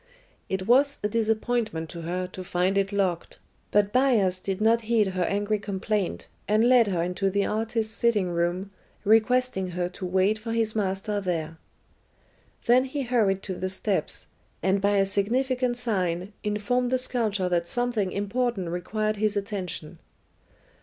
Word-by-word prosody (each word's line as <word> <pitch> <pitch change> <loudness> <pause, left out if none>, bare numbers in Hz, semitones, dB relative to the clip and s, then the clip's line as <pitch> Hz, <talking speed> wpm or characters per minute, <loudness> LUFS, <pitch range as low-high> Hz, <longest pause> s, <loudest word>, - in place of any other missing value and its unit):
It 190 0 -2
was 275 +5 +4
a - - +2
disappointment 220 -5 0
to 170 - -7
her 180 +2 -2
to 185 0 -8
find 180 +2 0
it 195 0 +1
locked, 190 -4 -1 0.3
but 205 0 +2
Bias 230 -9 +3
did 190 0 -3
not 225 +2 +3
heed 220 -4 +3
her 185 -1 -3
angry 205 +2 0
complaint, 200 0 -2 0.2
and 215 +3 +3
led 245 -3 +6
her 175 -4 0
into 180 +2 0
the 200 +1 +1
artist's 220 0 -1
sitting 220 -5 +1
room, 175 +3 -1 0.3
requesting 225 -1 +3
her 175 -1 0
to 185 +1 -7
wait 190 +4 +2
for 225 +1 -4
his 225 -1 0
master 200 0 -1
there. 165 -3 -3 1.1
Then 250 +2 +5
he 275 +1 -3
hurried 215 -6 +1
to 190 - -4
the 185 +1 -3
steps, 195 +1 -2 0.4
and 190 +1 +2
by 200 0 +3
a 195 - +4
significant 245 +5 0
sign 190 -5 -1
informed 225 +4 0
the 255 - +2
sculptor 220 -7 0
that 170 -1 0
something 240 -4 0
important 205 -2 -1
required 215 +5 -2
his 210 0 +1
attention. 180 -5 -5
205 Hz, 155 wpm, -26 LUFS, 185-230 Hz, 1.1 s, led